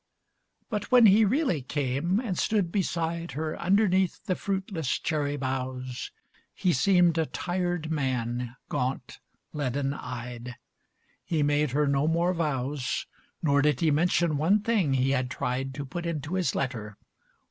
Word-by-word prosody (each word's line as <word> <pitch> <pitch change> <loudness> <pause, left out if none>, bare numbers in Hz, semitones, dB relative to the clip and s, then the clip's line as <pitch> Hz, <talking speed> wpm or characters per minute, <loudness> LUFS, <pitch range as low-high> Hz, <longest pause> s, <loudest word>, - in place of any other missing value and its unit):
But 210 -2 -2
when 250 -2 +8
he 215 +2 +7
really 235 - +1
came, 140 - 0
and 225 -7 -2
stood 195 -2 +1
beside 170 -3 -1
Her 155 +2 -3
underneath 190 -1 +2
the 185 - +1
fruitless 190 -6 -2
cherry 145 -3 -1
boughs, 130 -1 -4 0.5
He 180 - +1
seemed 175 +3 +4
a 160 - +1
tired 175 -3 -2
man, 125 -4 -2
gaunt, 130 +2 -3 0.3
leaden 140 -1 -1
eyed. 125 -1 -7 0.7
He 160 -3 0
made 145 0 +2
her 150 +1 +3
no 140 +1 +2
more 170 +3 +2
vows, 145 -5 -2 0.4
Nor 145 -2 +4
did 145 -3 +2
he 160 -2 +3
mention 165 0 +2
one 185 +8 +3
thing 195 -13 +2
he 130 +1 +2
had 130 -2 0
tried 130 +1 -2
To 140 -1 -4
put 170 +6 -5
into 155 -1 -3
his 185 -2 0
letter. 105 -6 -3
150 Hz, 145 wpm, -27 LUFS, 135-175 Hz, 0.7 s, when